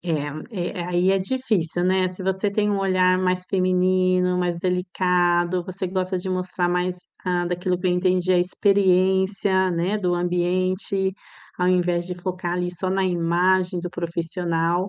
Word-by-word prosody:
É, 165 +4 -3
e - - -6
aí 175 +1 +1
é 195 - +3
difícil, 195 -6 -1
né, 185 0 +2
se 185 +1 -7
você 190 +2 0
tem 210 +1 +1
um 200 - 0
olhar 185 -1 +2
mais 185 0 0
feminino, 185 -1 +2
mais 175 -1 0
delicado, 180 -1 +1
você 185 0 -5
gosta 185 0 -2
de 185 +1 -4
mostrar 185 -1 -1
mais, 180 +1 0 0.3
hã, 180 -1 +1
daquilo 180 +1 -1
que 185 - -3
eu - - +2
entendi, 180 0 +1
a 180 - +4
experiência, 190 0 +2
né, 175 +5 0
do 180 -3 0
ambiente, 185 +2 0 0.5
ao 180 - +1
invés 175 -1 +1
de 180 - -4
focar 180 -1 -4
ali 180 0 -1
só 180 +1 -4
na 190 +1 +1
imagem 180 +1 +1
do 180 0 -5
profissional, 170 +1 -1
180 Hz, 160 wpm, -23 LUFS, 175-185 Hz, 0.5 s, a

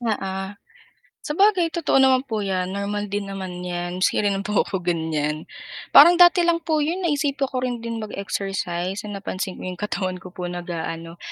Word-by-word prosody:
Oo, 195 -3 -3 0.7
sabagay 365 +2 +3
totoo 340 -5 +2
naman 260 -1 +5
po 220 -1 -1
'yan 185 -1 -1
normal 200 +1 -3
din 205 0 -2
naman 185 -2 -6
yan, 175 0 -4
maski - - +2
rin 200 -1 0
po 210 -1 +2
ako 190 - -3
ganyan. 160 -3 -2 0.4
Parang 325 +5 +9
dati 350 0 +6
lang 335 -1 +2
po 315 -1 0
'yon 335 +5 -1
naisipan 285 -4 0
ko 255 - -4
rin 245 -2 -2
din 230 0 -4
mag-exercise 195 -3 -3
nong 205 -1 -5
napansin 190 -1 -4
ko - - -10
'yong 180 -1 -6
katawan 185 -3 -2
ko 185 - -10
po 180 0 -6
nag-aano, 170 -1 -5
200 Hz, 175 wpm, -23 LUFS, 180-260 Hz, 0.7 s, Parang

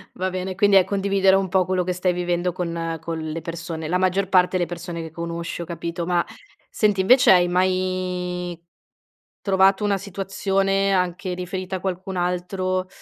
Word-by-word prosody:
va 185 +1 -1
bene, 185 0 -4
quindi 200 +1 +4
è 190 - +6
condividere 195 -1 +2
un 195 0 +1
po' 185 0 +2
quello 185 0 0
che 180 +1 -1
stai 180 0 0
vivendo 175 0 -1
con 170 -2 -3
con 165 0 -4
le 160 +1 -4
persone 165 -1 -5
la 180 +3 +1
maggior 185 +1 +1
parte 185 0 +3
le 175 - +1
persone 170 0 -6
che 160 -1 -7
conosci, 170 +1 -5
ho - - -4
capito, 170 +1 -4
ma 175 0 +1 0.4
senti 210 -3 +1
invece 250 +7 +6
hai 180 -1 +5
mai, 180 -1 -1 0.8
trovato 195 +1 +3
una 205 -1 +2
situazione 195 0 0
anche 180 0 -1
riferita 185 +1 -4
a - - -9
qualcun 190 +1 -4
altro, 185 +1 -1
180 Hz, 170 wpm, -23 LUFS, 175-190 Hz, 0.8 s, è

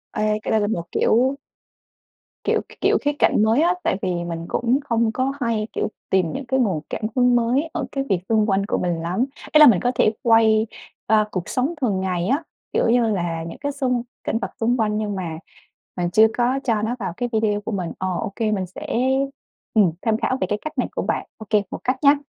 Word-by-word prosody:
Ê, 215 0 +1
cái - - -2
đây 220 - +3
là 205 - +1
một 175 -6 -1
kiểu 260 +4 +2 1.1
kiểu - - +1
k - - -20 0.2
kiểu - - +4
khía 290 - +1
cạnh 210 - +4
mới 225 +7 +3
á, 350 +2 +4
tại - - +1
vì 185 - -1 0.2
mình 165 -1 -4
cũng 245 +3 +1
không 230 -1 +2
có 260 +4 -1
hay, 225 -2 0
kiểu, - - -1 0.2
tìm 185 -4 +2
những 275 - -5
cái 265 +2 0
nguồn 190 -11 +1
cảm - - -4
hứng 245 -1 +4
mới 250 +7 +1
ở 310 -6 -2
cái 275 -1 -1
việc 190 - +2
xung 220 -1 +3
quanh 195 +1 +2
của - - -1
mình 175 -2 -1
lắm. 180 +9 0 0.3
Ý 305 - +6
là 300 - +10
mình 195 -7 +6
có 245 - +1
thể 215 - +3
quay, 225 -1 +4 0.4
ơ, 215 -1 +3
cuộc 185 -3 -4
sống 265 +7 0
thường 205 -7 +1
ngày 180 -2 -1
á, 285 +6 +1 0.3
kiểu - - +2
như 240 0 +4
là, 170 -5 -2
những 165 - -8
cái 285 0 -2
xung 255 -4 -1 0.2
cảnh 225 - -1
vật - - -4
xung 240 +2 +2
quanh 215 -2 +1
nhưng 210 -2 -2
mà 170 -4 -4 0.6
mình 175 -1 0
chưa 220 +3 +6
có 250 +3 +2
cho 225 -4 +1
nó 230 +3 -1
vào 190 -4 -3
cái 245 0 -2
video 210 -1 +1
của 225 - -5
mình, 185 -4 -3
ờ, 185 - -2
OK, 200 - -6
mình 190 -3 -1
sẽ, 280 - -9 0.9
ừm, 205 -6 +4
tham 220 -2 +1
khảo 260 +2 0
về 185 - +1
cái 210 - -1
cách 310 0 -7
này - - +1
của - - 0
bạn. - - -1
OK, 215 -1 0
một - - -5
cách 255 +1 +1
nhá. 285 +1 +7
220 Hz, 235 wpm, -22 LUFS, 195-250 Hz, 1.1 s, là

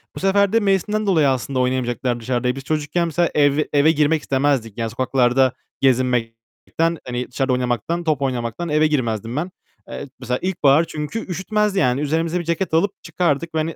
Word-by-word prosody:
Bu - - -6
sefer 200 +2 +2
de 230 - +5
mevsimden 210 +1 0
dolayı 160 -7 +4
aslında 130 0 -1
oynamayacaklar 125 -1 -1
dışarıda. 125 +1 -1
E, 125 - -1
biz 135 - -7
çocukken, 155 +3 -1
mesela, 170 +1 +1
ev 145 0 +3
eve 145 +2 +5
girmek 155 0 +2
istemezdik. 135 -6 0
Yani, 115 -1 -2
sokaklarda 130 +1 +2 0.3
gezinmekten, 125 +5 0
hani, 125 0 -3
dışarıda 130 +1 0
oynamaktan, 125 +7 -1
top 155 -4 0
oynamaktan 125 +4 -2
eve 155 +1 +3
girmezdim 115 -5 -2
ben. 170 +5 -2 0.4
Eee, 140 - -7
mesela, 125 0 -2
ilkbahar 160 -5 +3
çünkü 155 +8 -5
üşütmezdi 200 +3 0
yani. 125 -3 +2
Üzerimize 165 +4 0
bir 175 - -4
ceket 170 +2 -2
alıp 170 +5 +3
çıkardık 165 -1 -1
ve, - - +1
hani, 160 +1 -2
145 Hz, 175 wpm, -21 LUFS, 125-170 Hz, 0.4 s, de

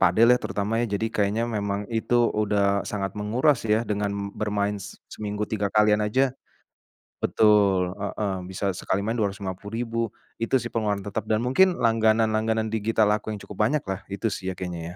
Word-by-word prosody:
padel 95 +5 +5
lah 125 - +3
terutama 105 +3 -1
ya 120 - 0
jadi 110 +3 -1
kayaknya 105 +2 +1
memang 100 -3 -2
itu 120 +1 +2
udah 100 -1 +1
sangat 100 -2 -3
menguras 120 +6 +1
ya 110 +2 +3
dengan 105 -2 -1 0.2
bermain 105 -1 -1
s - - -9 0.2
seminggu 105 0 -3
3 105 -1 -2
kalian 105 +1 +3
aja 125 +5 +2 0.9
betul, 100 -4 +3
heeh, 100 -1 -3 0.2
bisa 95 0 -2
sekali 95 - -1
main 115 +2 -1
Rp250.000 105 +3 -3 0.4
itu 115 +3 -1
sih 120 - -4
pengeluaran 105 -3 -1
tetap 100 +1 -3
dan 110 - +3
mungkin 175 +10 +3
langganan 115 -1 +3
langganan 110 0 0
digital 110 0 +1
aku 110 +1 -5
yang 105 - -5
cukup 105 - -10
banyaklah 110 -6 -1
itu 100 +3 -1
sih 95 -3 -3
ya - - -5
kayaknya 90 -2 -4
105 Hz, 170 wpm, -25 LUFS, 100-115 Hz, 0.9 s, padel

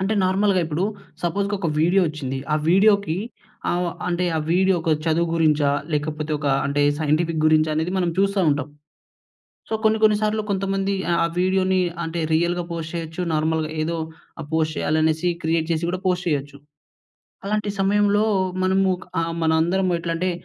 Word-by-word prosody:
అంటే 195 +3 0
నార్మల్‌గా 190 0 +2
ఇప్పుడు 160 +4 -1 0.4
సపోజ్‌కి 200 +4 -1
ఒక 170 -4 -1
వీడియో 180 +4 +3
వచ్చింది. 140 -4 -4
ఆ - - +4
వీడియో‌కి 200 -2 +4 0.5
ఆహ్, 175 0 0 0.2
అంటే 180 +1 0
ఆ - - +1
వీడియో 190 +1 +3
ఒక 160 - 0
చదువు 165 +1 +1
గురించా? 150 -3 +3 0.2
లేకపోతే 150 +1 -2
ఒక 145 - -4 0.2
అంటే 140 +1 +1 0.2
సైంటిఫిక్ 160 +1 0
గురించా? 155 0 +3
అనేది 160 +4 -1
మనం 175 -2 +1
చూస్తా 200 0 +2
ఉంటాం. 145 0 -1 1.0
సో - - -3
కొన్ని 220 0 +3
కొన్ని 210 -1 +5
సార్లు 215 0 +1
కొంతమంది 195 0 -1 0.3
ఆ - - +3
వీడియో‌నీ 185 0 +2 0.3
అంటే 165 +1 -4
రియల్‌గా 175 +2 +1
పోస్ట్ 165 0 -5
చేయొచ్చు. 165 +1 -4
నార్మల్‌గా 155 0 0
ఏదో 165 +1 -2 0.4
ఆ! - - -5
పోస్ట్ 160 -1 0
చేయాలనేసి 160 +2 +1
క్రియేట్ 160 0 0
చేసి 165 +1 0
గూడా 185 +1 -3
పోస్ట్ 180 -1 0
చేయొచ్చు. 145 -1 -3 0.9
అలాంటి 210 0 -1
సమయంలో 205 +2 +3 0.4
మనము 190 0 +2 0.3
ఆ! - - 0 0.2
మనందరం 170 +4 +2
ఎట్లా 165 0 -3
అంటే 185 +2 0
170 Hz, 155 wpm, -22 LUFS, 155-190 Hz, 1.0 s, కొన్ని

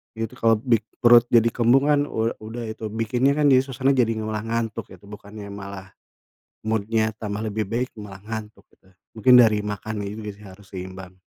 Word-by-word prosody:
Itu 115 -1 -4
kalau 115 0 +4
bik 115 -1 +1 0.2
perut 120 -1 +7
jadi 115 -1 +4
kembung 125 +4 +3
kan, 145 0 +2
u 115 -2 -1
udah 110 +2 -7
itu 110 0 -6
bikinnya 120 +6 +1
kan, 150 - +2
jadi 130 -1 +6
suasana, 135 +1 0
jadi 115 -3 +2
malah 110 0 -3
ngantuk 115 -1 -3
gitu, 95 0 -15
bukannya 105 0 -10
malah 100 -1 -9 0.7
mood-nya 110 0 0
tambah 105 0 -4
lebih 110 -1 -2
baik, 120 +4 -2
malah 100 -2 -10
ngantuk 110 -2 -7
gitu. 95 - -28 0.3
Mungkin 125 +3 +6
dari 110 -4 +6
makannya 105 0 -4
juga 110 -1 -6
sih 105 +1 -15
harus 95 +1 -15
seimbang. 95 0 -8
110 Hz, 180 wpm, -23 LUFS, 105-115 Hz, 0.7 s, perut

